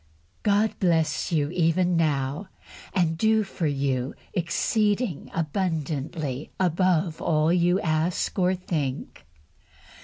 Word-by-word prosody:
God 210 +1 +2
bless 165 -4 +1
you 150 -2 +1
even 175 +1 +2
now, 150 +2 0 0.4
and 165 -3 0
do 220 +1 +3
for 185 -4 -3
you 135 -2 -1 0.2
exceeding 205 - 0
abundantly 155 -4 -2
above 180 -2 +1
all 155 +1 +2
you 175 +1 +3
ask 160 +4 0
or 185 +1 +3
think! 150 -7 -4
165 Hz, 100 wpm, -25 LUFS, 155-185 Hz, 0.4 s, do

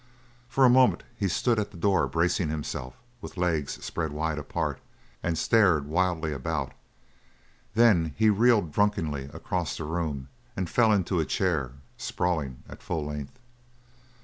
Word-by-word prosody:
For 135 +1 +4
a - - +8
moment 125 0 +5
he 105 -4 -1
stood 115 +5 +1
at 105 -1 -2
the 100 - -13
door, 95 +2 +2
bracing 85 0 +1
himself 70 -4 -4 0.3
with - - -9
legs 80 -5 -1
spread 80 -3 -3
wide 80 0 -2
apart, 75 - -3 0.4
and 85 -2 -1
stared 90 -8 +3
wildly 80 -1 0
about 70 +1 -3 1.0
then 95 -10 +4
he 110 -1 +5
reeled 105 -5 +3
drunkenly 80 -8 0
across - - -3
the - - -5
room 75 -4 -3 0.3
and 95 -2 -1
fell 115 +4 +3
into 95 -3 +1
a 80 - +1
chair, 75 -11 0 0.2
sprawling 80 -8 -2
at - - -11
full 80 -3 -3
length. 75 - -6
85 Hz, 150 wpm, -27 LUFS, 75-100 Hz, 1.0 s, a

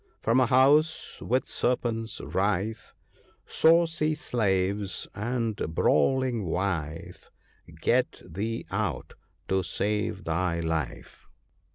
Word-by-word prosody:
From 115 +3 +2
a 130 - +4
house 145 +5 +3
with 130 +2 0
serpents 115 -3 -2
rife, 105 +3 -2 0.5
Saucy 160 -1 +3
slaves 100 -6 -1
and 115 0 -2 0.2
brawling 120 - +2
wife 85 -3 -3 0.2
— - - -19
Get - - +1
thee 115 +4 -4
out, - - -2 0.3
to 95 0 +1
save 105 +1 -2
thy 85 +1 -1
life." 80 -5 -4
105 Hz, 95 wpm, -27 LUFS, 95-125 Hz, 0.5 s, a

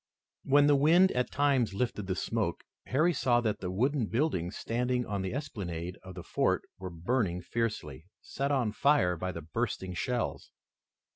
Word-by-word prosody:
When 145 +1 +5
the 145 0 +5
wind 170 +7 +5
at 125 0 0
times 135 -7 +1
lifted 105 -3 -2
the 95 - -1
smoke, - - -2 0.2
Harry 155 +7 +3
saw 125 -4 +2
that 110 -3 -1
the 90 - -4
wooden 125 +5 +1
buildings 115 - -1
standing 125 +1 -1
on 100 -3 -2
the 95 - -3
esplanade 90 - -5
of 95 -1 -10
the 90 - -7
fort - - +1 0.2
were 95 0 -5
burning 90 +1 -1
fiercely, 90 - -3
set 140 +1 -3
on 125 -6 +1
fire 110 -7 +3
by 90 +2 -3
the 85 -2 -7
bursting 95 0 -3
shells. 120 +8 -2
115 Hz, 165 wpm, -30 LUFS, 90-135 Hz, 0.2 s, When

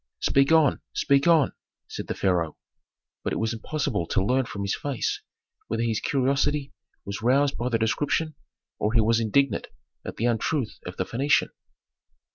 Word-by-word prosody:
"Speak 140 +2 +3
on, 160 -4 +4
speak 140 +2 +2
on!" 165 -4 +4 0.3
said - - -6
the - - -3
pharaoh. 85 -5 0 0.7
But - - -1
it - - -1
was 110 +1 -1
impossible 115 - -2
to 95 - +1
learn 130 +4 +2
from 100 -3 -5
his 100 - 0
face 140 -5 -2 0.5
whether 115 +1 -1
his 115 -2 0
curiosity 140 +1 0 0.3
was 100 +2 -5
roused 135 +4 +3
by 120 +2 -2
the 115 - +2
description, 145 +8 0 0.5
or 105 +1 0
he 115 - +5
was 115 +1 +3
indignant 115 +1 +1 0.4
at - - -6
the 115 - -1
untruth 120 +2 0
of 90 - -7
the 95 - -1
Phœnician. 135 +8 +2
120 Hz, 165 wpm, -26 LUFS, 110-140 Hz, 0.7 s, he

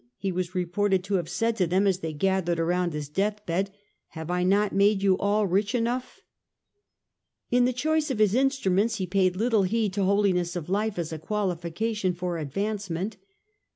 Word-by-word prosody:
he 195 - -2
was 180 0 -3
reported 185 +2 +1
to 200 +2 -4
have 175 -4 0
said 230 0 0
to 185 -5 +1
them 185 +4 +2
as 190 -2 +2
they 160 -3 -4
gathered 175 +1 0
around 175 +1 +1
his 150 -2 -4
deathbed; 195 +2 -1 0.2
" - - -49
have 160 +2 -5
I 180 0 0
not 200 +3 +2
made 200 0 +3
you 195 -1 +4
all 205 +1 +2
rich 200 +5 +1
enough? 245 +2 -2 0.6
" - - -53
In 245 0 +4
the 250 - +2
choice 310 +4 0
of 260 - -1
his 210 -2 +3
instruments 230 -5 +2
he 190 -3 -2
paid 185 0 +1
little 225 +1 +2
heed 205 +1 0
to 200 0 0
holiness 185 -3 +2
of 175 -2 -5
life 210 +1 0
as 165 -2 -3
a 160 - -5
qualification 185 +2 -2
for 175 -1 -3
advancement. 195 +4 -3
195 Hz, 190 wpm, -26 LUFS, 180-210 Hz, 0.6 s, you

